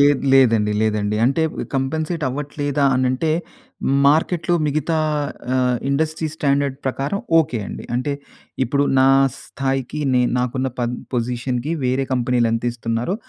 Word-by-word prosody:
లేదు 145 Hz, -1 st, +4 dB
లేదండి. 115 Hz, -6 st, +4 dB
లేదండి. 105 Hz, -1 st, 0 dB
అంటే, 135 Hz, +6 st, +2 dB, 0.3 s
కాంపెన్సేట్ 155 Hz, +5 st, -1 dB
అవ్వట్లేదా 145 Hz, +1 st, -2 dB
అని 130 Hz, 0 st, +1 dB
అంటే, 130 Hz, +5 st, 0 dB, 0.8 s
మార్కెట్‌లో 165 Hz, +4 st, +2 dB
మిగతా 155 Hz, +2 st, 0 dB, 0.6 s
ఆహ్, 125 Hz, -1 st, +2 dB
ఇండస్ట్రీ 155 Hz, +3 st, 0 dB
స్టాండర్డ్ 140 Hz, -3 st, 0 dB
ప్రకారం 135 Hz, +7 st, -1 dB, 0.2 s
ఓకే 140 Hz, -7 st, +1 dB
అండి. -, -, -7 dB
అంటే 130 Hz, +4 st, -1 dB, 0.5 s
ఇప్పుడు 140 Hz, +3 st, +1 dB
నా 130 Hz, -, +5 dB, 0.3 s
స్థాయికి 135 Hz, +1 st, -3 dB
నే 125 Hz, -, +4 dB, 0.2 s
నాకున్న 130 Hz, +1 st, -1 dB
ప -, -, -1 dB, 0.3 s
పొజిషన్‌కి 125 Hz, +3 st, -2 dB
వేరే 130 Hz, +2 st, +1 dB
కంపెనీలు 125 Hz, -1 st, +2 dB
ఎంత 115 Hz, +1 st, -1 dB
ఇస్తున్నారో, 115 Hz, +7 st, -2 dB
135 Hz, 125 wpm, -20 LUFS, 125-145 Hz, 0.8 s, నా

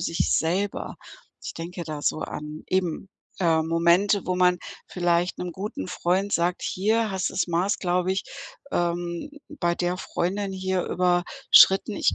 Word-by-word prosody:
sich 165 Hz, -, 0 dB
selber. 185 Hz, +5 st, -1 dB, 0.5 s
Ich -, -, -4 dB
denke 175 Hz, +2 st, -6 dB
da 155 Hz, -2 st, -5 dB
so 155 Hz, -, 0 dB
an 150 Hz, +1 st, -6 dB
eben, 185 Hz, 0 st, -1 dB, 0.3 s
äh, 165 Hz, -3 st, +3 dB
Momente, 170 Hz, +5 st, +3 dB
wo 180 Hz, -, 0 dB
man 180 Hz, 0 st, +3 dB, 0.3 s
vielleicht 175 Hz, 0 st, 0 dB
'nem 180 Hz, -1 st, -4 dB
guten 190 Hz, -, -5 dB
Freund 190 Hz, +3 st, 0 dB
sagt: 175 Hz, +1 st, +1 dB
„Hier 220 Hz, +3 st, +1 dB
hast 190 Hz, -1 st, -1 dB
das -, -, 0 dB
Maß, 175 Hz, +3 st, 0 dB
glaube 180 Hz, 0 st, 0 dB
ich, 190 Hz, -, -2 dB, 0.5 s
ähm, 175 Hz, -, -2 dB, 0.2 s
bei 175 Hz, -, -1 dB
der 175 Hz, 0 st, -1 dB
Freundin 195 Hz, +2 st, -2 dB
hier 190 Hz, -1 st, -1 dB
überschritten. 180 Hz, +3 st, +4 dB
Ich -, -, +2 dB
180 Hz, 150 wpm, -25 LUFS, 170-190 Hz, 0.5 s, überschritten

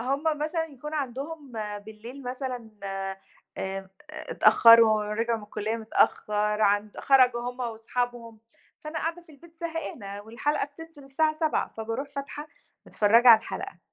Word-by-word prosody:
هُم 270 Hz, +4 st, -1 dB, 0.2 s
مثلًا 320 Hz, +2 st, -1 dB
يكون 300 Hz, 0 st, -8 dB
عندهم 280 Hz, -1 st, -5 dB
آآ، 210 Hz, -1 st, -4 dB
بالليل 220 Hz, +6 st, -11 dB
مثلًا 250 Hz, -2 st, -5 dB, 0.9 s
آآ، 190 Hz, 0 st, -5 dB, 0.4 s
اتأخروا 230 Hz, -2 st, +7 dB
رجعوا 230 Hz, +1 st, 0 dB
من 210 Hz, -, -10 dB
الكلية 210 Hz, +2 st, -3 dB
متأخر، 210 Hz, -1 st, +1 dB
عن 205 Hz, +1 st, +2 dB
خرجوا 255 Hz, -3 st, +4 dB
هُم 250 Hz, +1 st, -12 dB
وأصحابهم، 235 Hz, 0 st, -4 dB, 0.4 s
فأنا 310 Hz, +1 st, -5 dB
قاعدة 335 Hz, +2 st, -3 dB
في 325 Hz, -, -18 dB
البيت 330 Hz, +3 st, -18 dB
زهقانة، 250 Hz, -12 st, -5 dB
والحلقة 235 Hz, +8 st, -1 dB
بتنزل 325 Hz, -2 st, -12 dB
الساعة 310 Hz, +3 st, 0 dB
19:00، 315 Hz, -2 st, +1 dB
فباروح 225 Hz, +5 st, -4 dB
فاتحة، 280 Hz, +2 st, -7 dB, 0.4 s
متفرجة 230 Hz, +4 st, +4 dB
على 225 Hz, -2 st, +10 dB
الحلقة. -, -, -7 dB
245 Hz, 135 wpm, -27 LUFS, 220-295 Hz, 0.9 s, على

